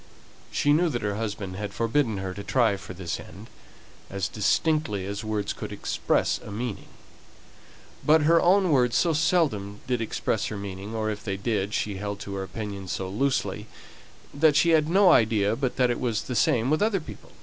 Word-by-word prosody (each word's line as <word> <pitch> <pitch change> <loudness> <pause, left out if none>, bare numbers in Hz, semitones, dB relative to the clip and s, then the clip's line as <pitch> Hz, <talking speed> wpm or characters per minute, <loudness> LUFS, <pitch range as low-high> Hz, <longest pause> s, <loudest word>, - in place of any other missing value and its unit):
She 145 - +2
knew 170 +3 +3
that 120 -6 -3
her 105 -1 -1
husband 100 -4 -4
had 105 -1 -5
forbidden 115 -1 +1
her 95 -1 -4
to 100 - -7
try 115 -4 +2
for 95 -1 -9
this 90 -2 -4
end, - - -12 0.6
as 95 -1 -2
distinctly 110 - 0
as 100 +2 -4
words 105 -2 -2
could - - -7
express - - 0
a - - -10
meaning; 110 0 -5 1.2
but 155 0 +5
her 165 +2 +5
own 185 0 +4
words 125 -4 +3
so 170 -2 +3
seldom 145 - +1
expressed 120 -3 -1
her 105 - -5
meaning, 100 +2 -6
or 110 -1 -1
if 105 - -6
they 100 -2 -3
did, 105 -1 -1
she 100 -2 -2
held 100 0 -4
to 100 - -6
her 100 - -3
opinions 100 -1 -6
so 95 - -3
loosely, 135 +7 -1 0.7
that 150 +1 +4
she 170 - +4
had 155 -1 +3
no 190 +1 +6
idea 110 -5 +3
but 130 0 -2
that 125 -1 +2
it 120 - -2
was 115 -4 -1
the 125 - -5
same 120 +3 +2
with 155 - +2
other 210 -2 +2
people. 120 - -12
110 Hz, 190 wpm, -26 LUFS, 100-145 Hz, 1.2 s, no